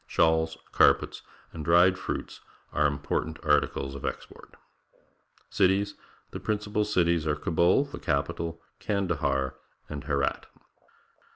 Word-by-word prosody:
Shawls, 80 0 +2
carpets, - - +3 0.3
and 80 - -6
dried 85 +4 +5
fruits 95 - -5 0.3
are 75 0 +3
important 75 +2 -2
articles 70 -2 +1
of 70 - -8
export. - - -7 1.0
Cities. 95 +2 +2 0.2
— - - -33
The - - -6
principal 105 0 -1
cities 85 -6 +1
are 75 - +2
Kabul, 85 - +2
the 140 - -9
capital, 80 +2 -2 0.2
Kandahar, 70 -10 -1 0.3
and 70 -2 -7
Herat. 70 -2 -1
80 Hz, 115 wpm, -28 LUFS, 75-95 Hz, 1.0 s, dried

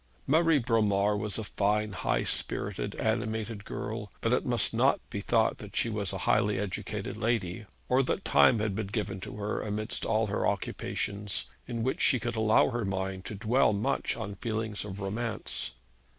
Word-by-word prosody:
Marie 160 +2 +4
Bromar 105 -5 +2
was 105 0 -3
a 110 - -3
fine, 105 +1 0
high 95 - 0
spirited, - - 0
animated 110 -1 -1
girl; 105 0 -5
but - - +1
it - - +2
must - - +3
not - - +3
be 100 - -3
thought 115 +1 +2
that 105 -1 -10
she 115 - +2
was 105 -4 -2
a - - -3
highly 105 -1 +3
educated 100 -1 -3
lady, 110 -3 -1 0.2
or 130 +1 +4
that 135 +8 -1
time 120 - +6
had 105 -1 0
been 105 -1 -2
given 100 -2 -3
to 95 - -7
her 105 0 -2
amidst 110 +2 -2
all 110 +1 +2
her 105 0 0
occupations, 100 0 -2 0.2
in 115 -1 -3
which 130 - -1
she 130 - +4
could 120 0 -3
allow 110 +3 +4
her 120 -1 -1
mind 95 -1 -3
to 105 - -5
dwell 110 +3 +3
much 100 +2 0
on 100 -3 -4
feelings 110 -1 -3
of 100 -1 -7
romance. 110 +4 -2
105 Hz, 180 wpm, -29 LUFS, 100-115 Hz, 0.2 s, time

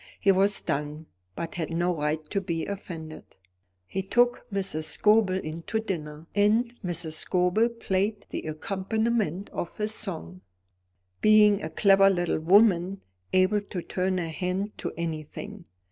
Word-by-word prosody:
He 195 - +4
was 195 +2 +3
stung, 150 +2 -3 0.3
but 165 - -5
had 165 -3 -3
no 175 +1 +1
right 150 0 -2
to 200 - 0
be 170 -3 -3
offended. 165 -6 -8 0.5
He 190 - -3
took 240 +5 +1
Mrs. 190 -6 0
Scobel 210 +1 +3
in 165 -3 -4
to 220 - 0
dinner, 155 -7 -5
and 220 +4 +2
Mrs. 170 -3 -2
Scobel 180 +7 +1
played 210 -2 -2
the - - -3
accompaniment 195 +3 -1
of 170 - -5
his 215 0 -1
song, 90 - -4 0.8
being 210 -1 +6
a 155 - -4
clever 195 +3 +5
little 175 -4 0
woman, 190 +1 +4 0.3
able 185 +3 +3
to 190 -3 -6
turn 185 0 -1
her 170 -2 -2
hand 185 +5 -3
to - - -3
any 165 -2 -2
thing. 150 - -9
185 Hz, 145 wpm, -27 LUFS, 165-205 Hz, 0.8 s, being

